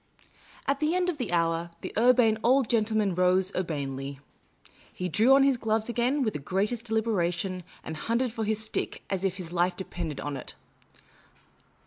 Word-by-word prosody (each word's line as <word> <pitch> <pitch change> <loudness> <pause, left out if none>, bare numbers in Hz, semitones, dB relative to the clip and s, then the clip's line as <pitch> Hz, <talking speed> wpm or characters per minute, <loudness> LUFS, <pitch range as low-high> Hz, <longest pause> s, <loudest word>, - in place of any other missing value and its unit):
At 275 0 0
the 310 +3 +1
end 365 0 +1
of 300 - -11
the 240 -7 -2
hour, 165 0 +1
the - - -6
Urbane 230 -1 +4
Old 255 +1 +4
Gentleman 215 -3 +1
ro.se 185 +1 +3
urbanely. 140 -5 -3 0.7
He 180 - -4
drew 220 - +5
on 275 - +5
his 275 -2 +3
gloves 220 0 0
again 245 +4 +1
with 215 - 0
the - - -4
greatest 205 - -1
deliberation, 190 -5 0 0.2
and 160 - -5
hunted 230 +8 -1
for 225 - -3
his 215 0 0
stick 215 - -3
as 190 -1 -1
if 190 -1 0
his 175 -2 -7
life 175 +1 +1
depended 170 -5 -5
upon 145 -1 -4
it. - - -9
210 Hz, 170 wpm, -28 LUFS, 175-235 Hz, 0.7 s, drew